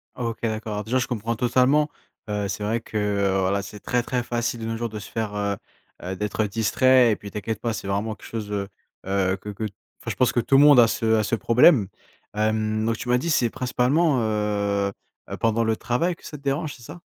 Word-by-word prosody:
OK, 115 -2 -3
d'accord, 110 -2 -2
déjà 115 +5 0
je 130 - 0
comprends 115 -1 -2
totalement. 130 +6 +3 0.4
Heu, 105 -1 -1
c'est 100 +2 -4
vrai 110 +2 -1
que, 110 - -6
heu, 100 -2 +1
voilà, 95 +1 +1
c'est 100 +1 -9
très, 125 +4 0
très 125 0 -2
facile 120 0 -2
de - - -4
nos 115 0 -2
jours 120 0 -3
de 105 0 -6
se 105 - -10
faire, 110 -2 -3
heu 100 0 -1 0.5
heu, 95 +2 -4
d'être 105 +2 -1
distrait 120 +4 +4
et - - +2
puis 100 - -10
t'inquiète 110 +2 -4
pas 115 -1 -1
c'est 105 - -6
vraiment 100 +3 -1
quelque - - -13
chose, 110 -2 -5
heu 100 -1 -2 0.4
heu, 95 -1 +1
que 105 - -9
que 105 +2 -6
enfin 100 -2 -10
je - - -5
pense 125 - +3
que - - +1
tout 135 +3 +3
le 140 - +7
monde 145 -3 +8
a 115 - +7
ce 110 0 +1
a 110 - +2
ce 110 - 0
problème. 115 - +5 0.5
Hem, 110 0 0
donc 115 0 0
tu - - -7
m'as 125 - +4
dit 165 +7 -2
c'est 125 -7 +2
principalement, 130 +5 +1
heu 105 -2 0 0.4
heu - - -5
pendant 115 0 +1
le 110 0 +1
travail 145 +11 -1
que - - -19
ça 150 - -7
te 140 - -20
dérange, 145 +2 -1
c'est 120 - -16
ça? 175 +9 -10
110 Hz, 240 wpm, -24 LUFS, 105-125 Hz, 0.5 s, monde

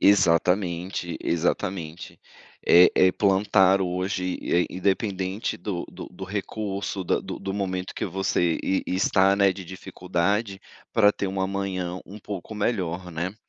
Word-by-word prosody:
Exatamente, 90 -2 +2
exatamente. 85 0 -2 0.5
É 90 +1 +8
é 95 0 +5
plantar 95 -1 +3
hoje, 90 0 -2
eh, 90 0 +2
independente 95 +1 -1
do 90 0 -4
do - - -9
do 95 +1 -8
recurso, 100 0 -4
da - - +1
do - - -6
do 95 - -4
momento 95 -2 -3
que - - -3
você 90 -2 0
e 95 - 0
e - - -1
está, 95 0 +3
né, 100 -1 +4
de 95 0 -9
dificuldade, 95 +3 -2 0.3
pra 105 -2 +5
ter 100 - -3
um 95 0 -3
amanhã 95 -2 -2
um 100 - -10
pouco 100 0 -7
melhor, 95 -5 -2
né. 85 +4 -3
95 Hz, 140 wpm, -25 LUFS, 90-100 Hz, 0.5 s, É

